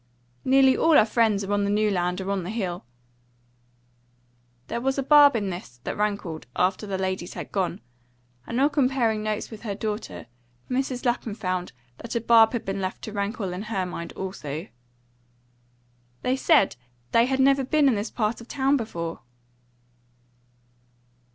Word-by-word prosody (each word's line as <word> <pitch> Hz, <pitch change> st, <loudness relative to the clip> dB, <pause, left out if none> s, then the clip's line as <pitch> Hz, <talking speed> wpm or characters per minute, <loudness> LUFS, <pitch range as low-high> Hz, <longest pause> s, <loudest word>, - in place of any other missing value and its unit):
"Nearly 265 Hz, 0 st, +5 dB
all 325 Hz, -2 st, +5 dB
our 215 Hz, -, +6 dB
friends 220 Hz, -3 st, +2 dB
are 195 Hz, -, -4 dB
on 205 Hz, 0 st, +1 dB
the 200 Hz, -, 0 dB
New 210 Hz, +1 st, +2 dB
Land 180 Hz, 0 st, -1 dB
or 190 Hz, +1 st, -3 dB
on 200 Hz, -1 st, 0 dB
the 175 Hz, -, -6 dB
Hill." 185 Hz, -, -3 dB, 1.8 s
There 235 Hz, -, -4 dB
was 270 Hz, +2 st, 0 dB
a 275 Hz, -, 0 dB
barb 290 Hz, -1 st, +7 dB
in 205 Hz, -4 st, -1 dB
this 150 Hz, -9 st, -9 dB
that -, -, -3 dB
rankled 200 Hz, -, -2 dB
after 185 Hz, +3 st, 0 dB
the 195 Hz, -1 st, -2 dB
ladies 185 Hz, -1 st, -3 dB
had -, -, -7 dB
gone; 190 Hz, -3 st, -1 dB, 0.7 s
and 235 Hz, -, -2 dB
on 285 Hz, +2 st, +4 dB
comparing 255 Hz, -6 st, +1 dB
notes 215 Hz, +1 st, -3 dB
with 220 Hz, -, -9 dB
her 205 Hz, -4 st, -4 dB
daughter, 210 Hz, +1 st, -5 dB, 0.5 s
Mrs. 255 Hz, -1 st, -1 dB
Lapham 235 Hz, -3 st, -1 dB
found 185 Hz, -4 st, -3 dB, 0.3 s
that 235 Hz, -, -7 dB
a -, -, +2 dB
barb 225 Hz, 0 st, +6 dB
had 235 Hz, -, -3 dB
been 195 Hz, 0 st, -3 dB
left 185 Hz, 0 st, -4 dB
to 215 Hz, -, -6 dB
rankle 200 Hz, -2 st, -2 dB
in 180 Hz, -, -5 dB
her 210 Hz, -3 st, -2 dB
mind 170 Hz, -1 st, -6 dB
also. 160 Hz, -5 st, -5 dB, 1.6 s
"They 255 Hz, -, +1 dB
said 270 Hz, -, +3 dB, 0.3 s
they 230 Hz, +1 st, +4 dB
had 265 Hz, 0 st, 0 dB
never 270 Hz, 0 st, +4 dB
been 290 Hz, +2 st, +3 dB
in 265 Hz, -, +4 dB
this 210 Hz, +1 st, -2 dB
part 225 Hz, 0 st, -2 dB
of 235 Hz, -, -12 dB
the -, -, -8 dB
town 275 Hz, +1 st, +3 dB
before." 170 Hz, -8 st, -5 dB
215 Hz, 170 wpm, -25 LUFS, 190-250 Hz, 1.8 s, barb